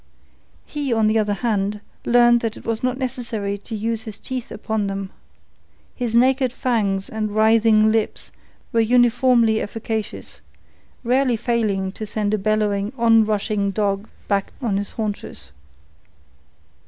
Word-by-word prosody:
He, 290 -3 -3
on 225 -2 +2
the 215 +1 +3
other 205 -1 0
hand, 210 -2 0 0.3
learned 240 0 +5
that 225 -1 -3
it - - -13
was 225 -1 -2
not 255 0 0
necessary 235 -6 -3
to 225 +3 -7
use 225 +1 -2
his 220 -3 -8
teeth 255 0 -5
upon 220 -1 -2
them. 195 -1 -4 0.8
His 240 -3 -2
naked 260 +1 +3
fangs 210 -7 0
and 215 -1 -3
writhing 220 0 +4
lips 220 -1 -1 0.4
were 230 - +3
uniformly 240 -1 +4
efficacious, 220 0 -5 0.6
rarely 250 0 +2
failing 210 -5 0
to 215 +2 -7
send 210 0 -1
a 215 - +1
bellowing 210 +1 0
on 225 -2 +5
rushing 205 -1 0
dog 200 +1 -1 0.2
back 200 -1 0
on 220 -7 0
its 205 - -4
haunches. 215 -2 -5
220 Hz, 140 wpm, -21 LUFS, 205-235 Hz, 0.8 s, learned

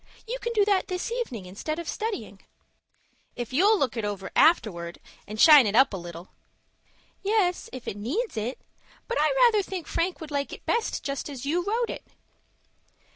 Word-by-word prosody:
You - - -3
can 475 - -3
do 415 -3 +3
that 400 -2 +2
this 365 +5 -3
evening 290 - -4
instead 205 +12 -5
of 340 -1 -6
studying." 440 -2 -4 1.0
"If 240 0 -5
you'll 405 +10 +5
look 265 - 0
it 225 - -2
over 205 -2 -4
afterwards, 175 - +3 0.3
and 215 +1 -7
shine 295 -5 +9
it 205 - -1
up 265 -2 +5
a - - -1
little." 170 0 -9 0.9
"Yes, 395 -3 +1
if 255 -1 -9
it - - -3
needs 310 - -2
it; 225 +4 -3 0.5
but 485 - -1
I - - +4
rather 475 -4 +5
think 375 -4 -6
Frank 355 +2 -1
would 315 -2 -8
like 280 -1 -2
it - - -10
best 465 -1 -1
just 275 +1 -4
as 275 -2 -7
you 340 +5 0
wrote 455 +4 -1
it." - - -9
310 Hz, 180 wpm, -26 LUFS, -, 1.0 s, shine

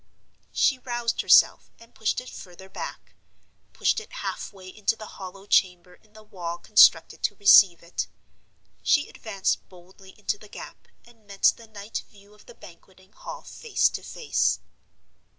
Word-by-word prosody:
She 265 -3 +2
roused 240 -2 -2
herself, - - +5
and 230 0 -19
pushed 220 - -1
it 250 - -11
further 185 +1 -12
back—pushed - - -5
it 440 - -13
halfway 195 - -6
into 210 +3 -1
the 215 - -10
hollow 195 -1 -10
chamber 180 -3 +1
in 215 +2 -25
the 215 0 -15
wall 175 -5 -6
constructed - - +5
to - - 0
receive 195 -4 +6
it. 170 - -4 0.7
She 295 - +2
advanced 200 -4 -3
boldly 185 +1 -17
into 205 -1 -3
the 210 - -15
gap, - - -11 0.2
and 230 -3 -22
met 200 -1 +3
the 230 - -15
night 210 0 -6
view 205 0 -20
of 210 - -21
the - - -14
Banqueting 185 +2 -17
Hall - - -9
face 460 -3 0
to - - -6
face. 470 - -1
200 Hz, 150 wpm, -25 LUFS, 185-225 Hz, 0.7 s, receive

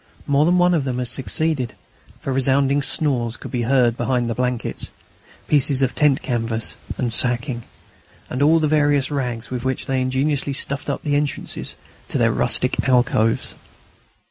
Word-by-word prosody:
More 145 +1 +3
than 175 +2 +3
one 180 0 +4
of 160 -5 +1
them 130 -2 -2
had 125 -1 -2
succeeded, 130 +2 -1 0.4
for 135 - -3
resounding 135 +2 +2
snores 125 -6 -1
could - - -9
be 125 -3 -1
heard 120 -1 +3
behind 125 -2 0
the - - 0
blankets, 125 0 -2 0.6
pieces 140 -2 +2
of 130 - +1
tent 150 -3 +2
canvas 115 -3 -2 0.2
and 120 -3 -1
sacking, 125 0 0 0.7
and 130 - -4
all 160 +3 +5
the 155 - +1
various 145 -2 +2
rags 125 -5 -3
with 125 -1 -3
which 130 0 -2
they 135 -1 0
had 130 - 0
ingeniously 140 +2 0
stuffed 140 +1 -1
up - - -3
the 145 -2 0
entrances 145 0 -2 0.3
to - - -2
their - - +3
rustic - - +1
alcoves. 120 -3 +2
130 Hz, 170 wpm, -21 LUFS, 125-145 Hz, 0.7 s, all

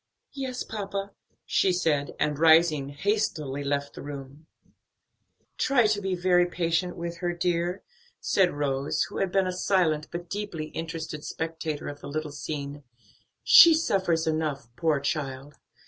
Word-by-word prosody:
"Yes, 265 -3 -4
papa," 200 -1 -5 0.3
she 190 - +2
said, 160 -5 0
and 150 -1 0
rising, 160 -3 +5
hastily 150 -5 -1
left 140 0 -2
the - - -9
room. 140 +1 -9 1.1
"Try 255 -3 +3
to 210 -1 +1
be 190 -1 -1
very 180 0 +3
patient 175 0 -1
with 170 0 -5
her, 175 -1 -2
dear," 175 +1 -1 0.4
said 190 -3 +2
Rose, 140 -1 -1
who - - -7
had 195 -2 0
been 195 0 +2
a 185 - -1
silent, 175 -5 +1
but 175 0 -6
deeply 175 -5 -4
interested 160 -2 -5
spectator 160 -2 -4
of 145 0 -7
the - - -8
little 155 +1 -3
scene; 145 0 -6 0.6
"she 335 -2 +9
suffers 185 - +1
enough, 155 -5 -2
poor 160 -4 +1
child!" 140 -1 -3
165 Hz, 145 wpm, -27 LUFS, 145-185 Hz, 1.1 s, she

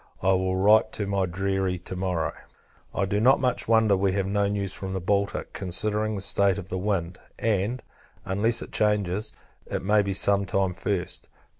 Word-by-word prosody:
I 95 - +4
will 95 0 +1
write 105 +3 +4
to 105 - -3
my 100 -1 0
deary 95 +1 -1
to 90 +1 -8
morrow. 90 -4 -1 0.6
I 100 - 0
do 100 +2 0
not 130 +5 +5
much 125 -2 0
wonder 110 -2 +4
we 95 0 +1
have 100 -1 0
no 100 +1 +1
news 100 -2 -2
from 95 -1 -5
the 95 - -1
Baltic, 100 +2 -1
considering 105 +3 -1
the 100 - -4
state 100 0 +3
of 95 -2 -7
the 95 - -3
wind; 90 -3 -2 0.2
and, 110 +3 -1 0.4
unless 110 +5 +1
it - - -12
changes, 105 -1 0 0.4
it - - -3
may 105 +2 +4
be 100 -1 -2
some 100 +1 +2
time 95 -1 0
first. 90 0 -3
100 Hz, 185 wpm, -26 LUFS, 95-105 Hz, 0.6 s, not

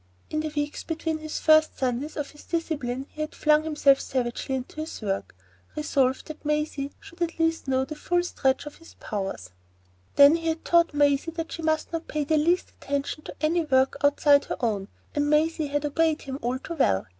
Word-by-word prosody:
In 310 - 0
the 310 0 -2
weeks 295 0 -2
between 320 -1 -2
the 310 - -7
first 310 0 +4
few - - -28
Sundays 260 +5 -1
of 295 -2 -3
his 295 - -15
discipline 280 -6 -2
he 305 - -7
had 305 - -4
flung 300 0 +3
himself 295 -3 +4
savagely 255 +1 -2
into 260 +3 -6
his 310 +1 -5
work, 195 - -3 0.4
resolved 270 -4 +1
that 310 -1 -9
Maisie 300 -2 -1
should 345 +1 -15
at 335 -1 -1
least 325 -2 0
know 265 0 +1
the 305 - -6
full 350 +3 0
stretch 270 -6 0
of 295 - -9
his 330 - -16
powers. 195 - -5 0.6
Then 285 +3 +8
he 330 0 -5
had 320 0 -2
taught 340 -3 +3
Maisie 290 +1 +3
that 330 0 -5
she 330 - -5
must 315 0 0
not 330 0 -3
pay 300 -1 -1
the 310 +2 +2
least 340 +4 +2
attention 280 +2 -4
to - - -8
any 330 +2 +2
work 265 -3 +2
outside 285 0 +5
her - - -4
own, 210 -5 -1 0.3
and 290 0 +1
Maisie 310 0 +2
had 290 +1 -1
obeyed 315 +1 +1
him 270 0 -5
all 245 +2 -1
too 330 - -7
well. 180 - +2
300 Hz, 205 wpm, -26 LUFS, 270-320 Hz, 0.6 s, Then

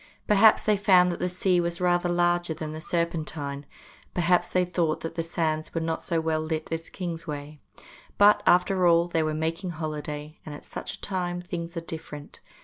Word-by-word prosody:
Perhaps 210 +1 +6
they 210 -1 +3
found 185 -3 +5
that 175 - -5
the 180 - 0
sea 180 0 +1
was 170 0 -3
rather 175 -1 +2
larger 175 -1 +1
than 155 -1 -5
the 155 - -7
Serpentine, 155 -4 -3 0.5
perhaps 175 0 +3
they 180 0 +1
thought 170 -3 -1
that 165 - -5
the 165 - -2
sands 160 -1 -2
were - - +1
not 160 0 -2
so 170 -3 -1
well 160 -1 0
lit 155 0 -3
as 165 0 -4
Kingsway; 155 -5 -6 0.6
but, 205 +1 +6
after 180 0 +4
all, 170 0 +4
they 165 -2 0
were 155 -1 -1
making 165 +4 -2
holiday, 150 -2 -5
and 150 - -7
at - - -12
such - - -6
a - - -12
time 180 -2 -2
things 175 -1 -6
are - - -2
different. 160 -3 -8
170 Hz, 190 wpm, -26 LUFS, 155-180 Hz, 0.6 s, Perhaps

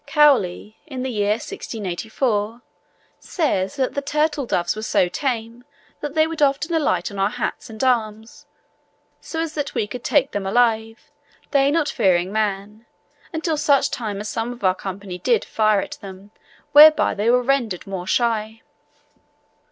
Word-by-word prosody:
Cowley 265 -9 +2
(in 260 -4 -5
the 260 - -3
year 210 -2 +1
1684) 220 +2 -3 0.6
says 240 - -1
that 265 -2 -1
the 280 - -2
"Turtledoves 280 - 0
were 215 - -5
so 200 -4 +2
tame, 235 +2 -3 0.4
that 295 0 -6
they 315 0 +4
would 325 -1 -5
often 290 +4 +1
alight 315 -8 0
on 200 - -7
our 195 +1 +2
hats - - -4
and 220 +3 -6
arms, 220 -3 -1 0.7
so 325 - -6
as 325 -2 -4
that 290 -2 -4
we - - +1
could 240 +3 -8
take 275 -2 +2
them 200 -1 -3
alive, 225 +2 0 0.4
they 275 -1 +3
not 305 0 +1
fearing 185 -6 +1
man, 210 +1 -3 0.4
until 320 -2 -2
such 285 -2 +2
time 210 -4 -4
as 210 - -5
some 225 +2 -3
of 245 -2 -11
our 185 -1 +4
company 190 -1 -7
did 230 +3 +1
fire 215 -2 +2
at - - -8
them, 195 +1 -11 0.4
whereby 305 +1 +7
they 210 +3 0
were 250 +1 +3
rendered 240 -8 0
more 190 -2 -6
shy." 225 0 0
225 Hz, 160 wpm, -21 LUFS, 205-275 Hz, 0.7 s, whereby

